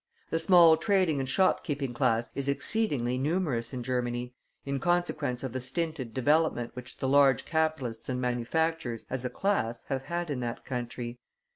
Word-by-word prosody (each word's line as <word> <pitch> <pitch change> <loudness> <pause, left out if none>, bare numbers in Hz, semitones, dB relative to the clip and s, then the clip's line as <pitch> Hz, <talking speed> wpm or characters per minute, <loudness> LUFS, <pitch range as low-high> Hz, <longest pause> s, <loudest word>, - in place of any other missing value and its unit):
The 165 - +1
small 165 -1 +7
trading 185 -8 +2
and 130 -1 -3
shopkeeping 145 -6 +1
class 120 -2 +1
is 140 0 -2
exceedingly 140 - 0
numerous 140 -6 -1
in 125 -2 -4
Germany, 125 0 -2 0.3
in 140 0 -2
consequence 155 -7 0
of 130 -3 -4
the 130 - -2
stinted 135 -1 -2
development 140 -1 +1
which 125 0 -7
the 130 - -2
large 135 -2 +4
capitalists 155 -9 -1
and 125 -1 -1
manufacturers 125 +1 -1
as 130 -1 -1
a - - 0
class 125 - -1
have 135 -1 -2
had 170 +1 -3
in 135 - -2
that 120 -1 -4
country. 120 -1 -5
135 Hz, 160 wpm, -29 LUFS, 125-160 Hz, 0.3 s, small